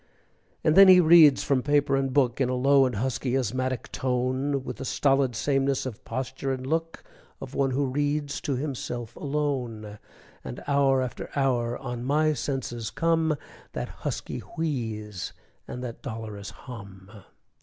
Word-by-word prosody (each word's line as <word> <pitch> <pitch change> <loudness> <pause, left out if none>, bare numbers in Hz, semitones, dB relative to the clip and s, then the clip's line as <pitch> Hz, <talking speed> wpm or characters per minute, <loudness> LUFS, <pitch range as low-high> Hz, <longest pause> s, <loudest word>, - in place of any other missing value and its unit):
And 155 - +3
then 195 0 +9
he 185 -1 +9
reads 160 -4 +7
from 135 -2 +2
paper 145 0 +2
and 135 -1 0
book, 130 -2 +2
In 125 - +2
a 130 - 0
low 135 +1 +4
and 125 - -4
husky 125 +3 -1
asthmatic 130 +1 -2
tone, 130 +2 -1
With 125 - -6
the 135 - -6
stolid 135 -2 +2
sameness 135 +1 +1
of 125 -5 -6
posture 130 +2 -3
and 130 -1 -4
look 165 +3 -2 0.4
Of - - -8
one 135 -1 +1
who 135 +2 0
reads 145 +2 -1
to 140 - -1
himself 120 -4 -4
alone; 125 -8 -3 0.4
And 65 -2 -7
hour 135 -2 +3
after 125 - -6
hour 125 -4 +1
on 120 -2 -5
my 155 +4 +2
senses 130 -5 -3
come 165 -1 +1 0.4
That - - -4
husky - - -5
wheeze 110 - -4 0.3
and 125 - -6
that 120 -2 -7
dolorous 110 -5 -6
hum. 100 -6 -11
130 Hz, 155 wpm, -26 LUFS, 120-145 Hz, 0.4 s, then